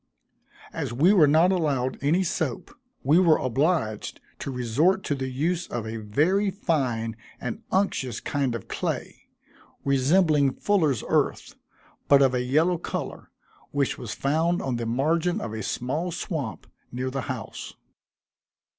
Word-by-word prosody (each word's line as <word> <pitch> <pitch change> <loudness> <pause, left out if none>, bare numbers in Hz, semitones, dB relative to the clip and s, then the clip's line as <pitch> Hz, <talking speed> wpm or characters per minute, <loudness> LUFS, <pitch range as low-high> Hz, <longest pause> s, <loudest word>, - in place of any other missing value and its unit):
As - - -3
we 155 +12 +4
were 165 -7 +6
not 160 +5 +5
allowed 140 -8 0
any 160 +7 +2
soap, 160 -8 -3 0.3
we 150 +6 +5
were 170 -4 +5
obliged 130 - 0 0.2
to - - -5
resort 135 - +1
to - - -1
the 135 -2 -3
use 165 +7 -1
of 115 -2 -4
a 110 +1 -4
very 155 - +1
fine 130 - -1 0.2
and 125 - -5
unctuous 140 - 0
kind 135 -4 -1
of 110 - -7
clay, - - -4 0.6
resembling 140 +1 +3
fullers' 155 - +1
earth, - - 0 0.5
but 140 -1 +6
of 130 -1 +3
a 125 - +1
yellow 160 +7 +2
color, - - -5 0.4
which 140 -2 -1
was 115 - -5
found 160 +5 +1
on 130 -3 -2
the 115 -1 -3
margin 160 +8 +1
of 115 - -5
a 110 - -4
small 140 - -2
swamp 145 - -4 0.3
near 130 +1 -3
the 135 0 -2
house. - - -6
140 Hz, 145 wpm, -26 LUFS, 125-170 Hz, 0.6 s, were